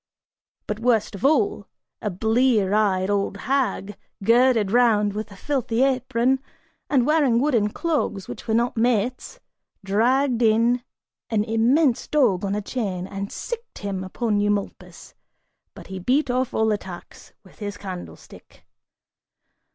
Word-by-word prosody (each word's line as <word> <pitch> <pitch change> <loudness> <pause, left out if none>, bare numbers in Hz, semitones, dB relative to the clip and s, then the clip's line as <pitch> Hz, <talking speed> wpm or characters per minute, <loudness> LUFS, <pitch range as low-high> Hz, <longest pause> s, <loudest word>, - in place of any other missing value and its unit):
But 210 0 -4
worst 230 -3 +1
of 200 - -8
all, 315 +9 +2 0.3
a 210 - -1
blear 220 +1 +2
eyed 200 -2 +2
old 200 0 -1
hag, 250 -6 -1 0.3
girded 230 -2 +4
round 215 -4 +3
with 215 +1 -5
a - - -11
filthy 250 +1 -1
apron, 260 -1 +1 0.5
and 260 -4 +3
wearing 285 -6 +3
wooden 240 -7 +2
clogs 280 - -2
which 120 - -8
were 220 - +1
not 235 +1 +1
mates, 240 +1 0 0.5
dragged 245 +5 +2
in 230 +2 +3 0.5
an 215 -2 +1
immense 235 +5 +2
dog 240 -12 +2
on 200 0 -1
a 210 - -3
chain, 195 -6 -3
and 200 +1 -6
"sicked" 475 -1 -7
him 195 -2 -4
upon 210 +2 -1
Eumolpus, 205 -1 -3 0.6
but - - -11
he 190 -1 -7
beat 260 +8 +1
off 255 0 0
all 220 0 +1
attacks 190 -4 -7
with 190 - -20
his 205 -1 -5
candlestick. 185 -3 -10
225 Hz, 135 wpm, -23 LUFS, 205-255 Hz, 0.6 s, girded